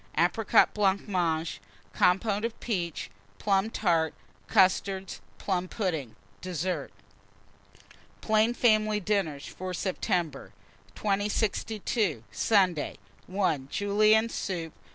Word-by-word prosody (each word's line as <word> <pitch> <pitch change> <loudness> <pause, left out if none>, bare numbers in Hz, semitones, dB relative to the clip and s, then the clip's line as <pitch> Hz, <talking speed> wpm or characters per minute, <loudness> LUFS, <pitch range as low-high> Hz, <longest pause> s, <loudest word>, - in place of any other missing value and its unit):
Apricot 180 +7 +4
Blancmange. 185 -5 0 0.3
Compôte 200 +3 +2
of 230 0 -3
peaches. 175 -8 -3 0.3
Plum 195 +1 +1
Tart. 165 -7 +1 0.3
Custards. 190 0 +2 0.2
Plum 185 -2 -1
pudding. 160 - -3 0.3
DESSERT. 175 -4 -3 1.3
PLAIN 220 +2 +2
FAMILY 215 -3 +3
DINNERS 185 -8 -1
FOR 185 0 -6
SEPTEMBER. 170 -5 -2 0.4
2062. 205 - -1
Sunday. 185 -8 +2 0.3
1. 185 -8 0
Julienne 215 +4 +3
soup. 170 -7 -4
2. - - -31
190 Hz, 90 wpm, -28 LUFS, 170-210 Hz, 1.3 s, Apricot